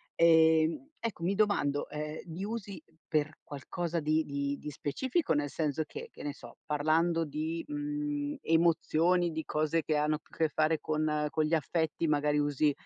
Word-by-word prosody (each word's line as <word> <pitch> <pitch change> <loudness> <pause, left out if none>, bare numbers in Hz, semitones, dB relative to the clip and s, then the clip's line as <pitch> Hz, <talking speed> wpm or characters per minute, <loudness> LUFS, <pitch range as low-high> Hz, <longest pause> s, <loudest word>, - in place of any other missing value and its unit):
Ehm, 160 - +4
ecco 220 -7 -4
mi 185 - +2
domando, 195 -9 +1
ehm, 150 +1 -5
li 170 +2 -6
usi 205 -2 -5 0.3
per 155 0 0
qualcosa 165 +4 -3
di 155 +1 +2
di 140 0 -2
di 150 - -6
specifico? 250 - -1
Nel 145 -1 0
senso 150 +1 -1
che, 470 +1 -8
che - - -12
ne 145 - -3
so, - - -13
parlando 160 +3 +2
di, 160 +3 -3
mhmm, 295 0 -2
emozioni, 170 +1 +3
di 160 0 -3
cose 155 +2 0
che 155 - 0
hanno 150 +1 +2
più - - -30
a - - -18
che 160 -1 +2
fare 155 +1 +1
con 150 -1 0
con 155 -1 +1
gli 155 - -1
affetti, 160 +1 -1
magari 150 0 +2
usi 145 0 +2
160 Hz, 175 wpm, -31 LUFS, 150-175 Hz, 0.3 s, Ehm